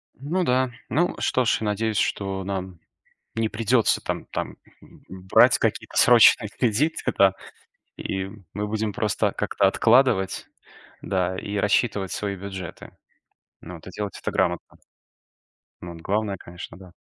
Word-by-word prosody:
Ну 160 +8 -2
да, 130 -3 +1 0.2
ну 175 +4 +1
что 130 -1 +1
ж, - - +3
я - - -2
надеюсь, 105 +1 -1
что 95 -1 -1
нам 95 -2 -5 0.6
не 115 -1 0
придётся, 115 +2 +2
там, - - -4
там - - -5 0.5
брать 95 0 +4
какие-то - - -2
срочные - - +6
кредиты, 125 +8 0
да, 95 -1 +5 0.6
и 95 0 -3 0.3
мы 105 +2 -3
будем 110 0 -2
просто 105 0 0
как-то 100 - +1
откладывать, 115 -2 +3 0.5
да, 95 -1 -1
и 100 +2 -4
рассчитывать 100 -1 +1
свои 100 -1 -3
бюджеты. 95 -2 -8 0.7
Надо 85 +1 -10
делать 105 +2 -5
это - - -3
грамотно. - - -1 1.1
Ну, 85 -1 -7
главное, 100 +3 -2
конечно, 85 -1 -10
да, 95 -1 -14
100 Hz, 130 wpm, -24 LUFS, 95-115 Hz, 1.1 s, срочные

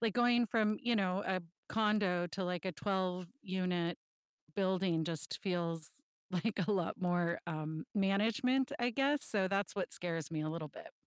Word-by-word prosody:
like, 230 -3 +1
going 240 -1 +4
from, 215 -1 +2
you 240 -1 +2
know, 190 0 +1
a 185 -2 0 0.3
condo 210 -5 +2
to 190 +2 -3
like 180 0 -2
a 185 - 0
twelve-unit 185 - -1 0.6
building 185 -4 +2
just 160 -2 -3
feels 170 -4 -1 0.4
like 200 +4 0
a - - +3
lot 185 0 0
more, 175 -1 +1
um, 155 -1 -3
management, 225 +7 +2
I 240 +1 +3
guess, 280 +3 +2
so 195 -3 +2
that's 200 +1 0
what 195 - -2
scares 165 -4 -2
me 155 -1 -1
a 155 - -1
little 160 -1 -4
bit. - - -11
185 Hz, 165 wpm, -35 LUFS, 170-215 Hz, 0.6 s, going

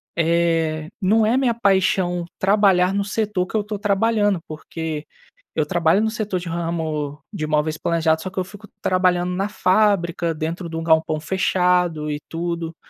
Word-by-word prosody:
eh, 165 -2 +1
não 215 +4 +3
é 235 +4 +2
minha 250 -3 +2
paixão 190 -4 +1
trabalhar 195 -2 +3
no 200 0 0
setor 205 -3 -1
que - - -8
eu 215 - +3
estou 205 -1 -5
trabalhando, 205 -1 +2
porque 155 0 -5 0.5
eu 155 - +1
trabalho 170 +4 +2
no 220 - +1
setor 210 -4 -2
de 175 - -8
ramo 160 -3 -3
de 155 -6 -3
móveis 155 +1 0
planejados, 160 -1 +1
só 185 - -4
que 190 - -20
eu 185 - +1
fico 205 +2 -13
trabalhando 180 -1 +2
na 195 +2 0
fábrica, 185 -5 +2
dentro 165 +3 -4
de 165 - -7
um 165 - -3
galpão 160 -1 +2
fechado 180 -2 +1
e 145 - -3
tudo, 170 -1 -3
175 Hz, 165 wpm, -21 LUFS, 160-200 Hz, 0.5 s, não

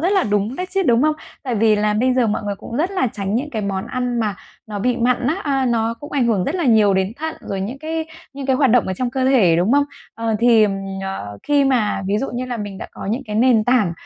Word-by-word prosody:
rất 350 +4 +1
là 385 - +3
đúng 210 +5 0
đấy 365 - -3
chứ, 390 0 +1
đúng 240 -7 +3
không? 305 0 +3 0.3
Tại 255 -4 -2
vì 220 0 +3
là 210 0 +1
bây 250 +4 +2
giờ 250 -2 +3
mọi 215 - -1
người 205 -1 -3
cũng 230 - -7
rất 335 +7 0
là 375 -9 0
tránh 200 -1 -3
những 275 +6 -1
cái 220 -5 -3
món 195 -1 -3
ăn 250 -1 -2
mà 210 -3 -1 0.3
nó 210 -2 -5
bị 245 +4 0
mặn 245 +1 +1
á, 295 - +2
à, 270 -3 0
nó 230 -1 0
cũng 290 - -9
ảnh 265 -4 +2
hưởng 205 -6 +1
rất 295 - -2
là 355 -3 -1
nhiều 215 -5 +4
đến 190 +2 0
thận, 320 +1 -4
rồi 195 - -4
những 225 +8 -4
cái 320 +2 -3 0.3
những 275 -1 -6
cái 265 -1 +2
hoạt 270 -2 +3
động 245 0 +4
ở 190 - -1
trong 245 +5 -2
cơ 260 0 -1
thể, 220 -11 +4
đúng 180 +7 +2
không? 285 0 +4 0.3
Ờ, 230 -1 -1
thì, 235 -1 +5
ờm, 205 - +2 0.3
à, 195 0 -4 0.2
khi 290 -1 +2
mà 240 -7 +1
ví 200 +2 +1
dụ 270 - -2
như 250 +1 -2
là 250 -1 -4
mình 205 -3 -6
đã - - -6
có - - -8
những 240 +5 -2
cái 210 0 -3
nền 230 -2 +4
tảng, 240 -8 +2
240 Hz, 285 wpm, -20 LUFS, 210-270 Hz, 0.3 s, thì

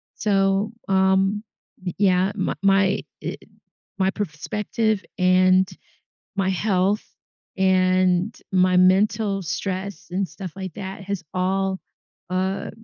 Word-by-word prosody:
So, 195 0 +1 0.2
um 190 +2 +3 0.4
Y 180 - -2
yeah, 190 -1 +3
m 190 - -1
my 195 0 +3 0.2
i - - -4 0.6
my 190 0 +2
perspective 210 +4 -2 0.2
and 185 0 +4 0.7
my 190 -1 +1
health 195 +1 +1 0.5
and 185 +1 +3 0.2
my 185 -1 +4
mental 195 +2 +3
stress 190 +3 -4
and 190 -1 -1
stuff 175 +2 -8
like 190 -3 -6
that 195 0 -7
has 195 -3 -4
all, 190 +1 0 0.5
uh, 190 +1 -1
190 Hz, 110 wpm, -23 LUFS, 185-200 Hz, 0.7 s, and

